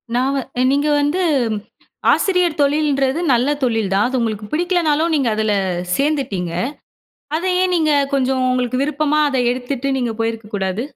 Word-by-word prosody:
நாங்க 270 +3 +1 0.3
நீங்க 285 +2 +1
வந்து 305 +6 0 0.9
ஆசிரியர் 360 -6 +1
தொழிலன்றது 285 -1 +1
நல்ல 245 +3 +2
தொழில் 225 -5 0
தான். 200 +2 +3
அது 260 0 -2
உங்களுக்கு 215 -3 -2
பிடிக்கலைனாலும் 330 -1 +1
நீங்க 265 -5 +1
அதில 215 -1 0 0.4
சேர்ந்துட்டீங்க. 265 - -1 0.9
அதை 365 +3 -1
ஏன் 370 - +1
நீங்க 310 -2 +2 0.2
கொஞ்சம் 260 -1 +1
உங்களுக்கு 255 0 -1
விருப்பமா, 300 +1 0
அத 270 - -1
எடுத்துட்டு 255 +2 -3
நீங்க 240 -3 -1
போயிருக்க 225 -1 -2
கூடாது? 190 +3 -1
270 Hz, 135 wpm, -19 LUFS, 235-300 Hz, 0.9 s, தான்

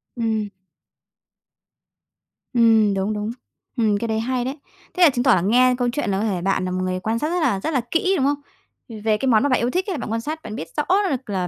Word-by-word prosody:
Ừm. 220 -3 -1 2.0
Ừm, 225 -4 +4
đúng, 195 +2 -1
đúng. 210 +1 -3 0.5
Ừm, 215 -3 +2
cái 230 +3 -3
đấy 220 0 -1
hay 245 +2 -1
đấy! 270 +3 -4 0.4
Thế 365 - +2
là 335 - +8
chứng 250 -3 -1
tỏ 260 -2 +5
là 180 - +1
nghe 250 +6 +4
câu 245 -1 0
chuyện 290 -1 -2
là 190 - 0
có - - -1
thể 190 -5 -1
bạn 190 0 0
là 185 - -3
một 185 0 -2
người 185 0 -2
quan 220 +4 -2
sát 305 - -1
rất 355 +1 0
là 205 -11 +1
rất 315 +11 -3
là 260 - +2
kỹ, 370 +3 +2
đúng 270 - +1
không? 285 +1 +1 0.7
Về 215 -1 +2
cái 265 - -2
món 230 +1 +4
mà 285 - +2
bạn 255 - +2
yêu 240 - +1
thích 365 +8 -1
ấy 380 - -1
là - - -3
bạn 220 - -5
quan 225 0 -1
sát, 310 +6 -5
bạn 215 - -7
biết 160 - -6
rõ 300 - +2 0.3
được 265 -5 -4
là 185 -3 -1
230 Hz, 260 wpm, -22 LUFS, 210-265 Hz, 2.0 s, là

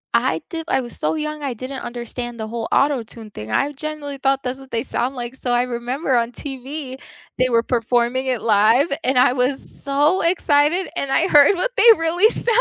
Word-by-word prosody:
I - - +1
di 330 -3 -5
I 265 - +1
was 240 - -9
so - - -1
young 305 -1 -4
I 275 -3 -3
didn't 255 +3 -7
understand 240 0 -6
the 220 - -4
whole 225 0 -4
Auto-Tune 230 -6 -1
thing, 110 - -8
I 280 - +1
genuinely 290 -1 -6
thought 270 0 0
that's 255 +1 -4
what 270 -1 -14
they 230 0 -1
sound 250 +3 -2
like. 240 -1 -5
So 250 - -3
I 245 0 +3
remember 250 +3 -2
on 235 +1 0
TV 270 +1 -7 0.4
they 255 0 +3
were 230 -1 +2
performing 240 +2 0
it 250 -3 -1
live 225 +6 +4 0.2
and 260 0 +2
I 250 0 +5
was 255 +1 0 0.3
so 290 +6 +2
excited 335 0 +2
and 275 - -2
I 335 +6 +2
heard 295 +6 +6
what - - -1
they - - +4
really 345 +6 +3
sounded - - -5
260 Hz, 205 wpm, -20 LUFS, 240-290 Hz, 0.4 s, heard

